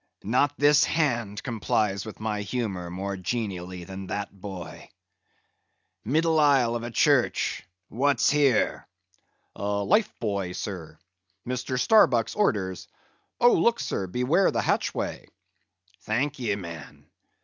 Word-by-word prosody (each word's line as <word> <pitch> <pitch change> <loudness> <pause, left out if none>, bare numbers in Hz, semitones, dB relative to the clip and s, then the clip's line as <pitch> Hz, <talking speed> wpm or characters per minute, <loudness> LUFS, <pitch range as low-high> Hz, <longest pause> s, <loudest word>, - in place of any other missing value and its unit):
Not 130 +7 +1
this 145 +1 +5
hand 120 -12 0
complies 110 -4 -1
with 110 - -9
my 105 -1 -2
humor 100 -5 -3
more 95 +3 -4
genially 95 -3 -4
than 95 +1 -8
that 100 +1 -4
boy.—Middle 125 - -5
aisle 135 -6 +4
of 120 - -2
a 120 - -5
church! 115 - +2 0.3
What's 140 +7 +2
here?" 140 -6 +2 0.7
"Life 105 - +1
buoy, 100 -5 -2
sir. 85 -5 -6 0.5
Mr. 125 0 -2
Starbuck's 130 - +4
orders. 100 - -1 0.5
Oh, 240 0 +6
look, 235 0 +3
sir! 95 - -2
Beware 125 - +2
the - - -1
hatchway!" - - -2 0.7
"Thank 130 +6 -1
ye, 110 -5 0
man. 85 -6 -9
110 Hz, 115 wpm, -26 LUFS, 95-135 Hz, 0.7 s, Oh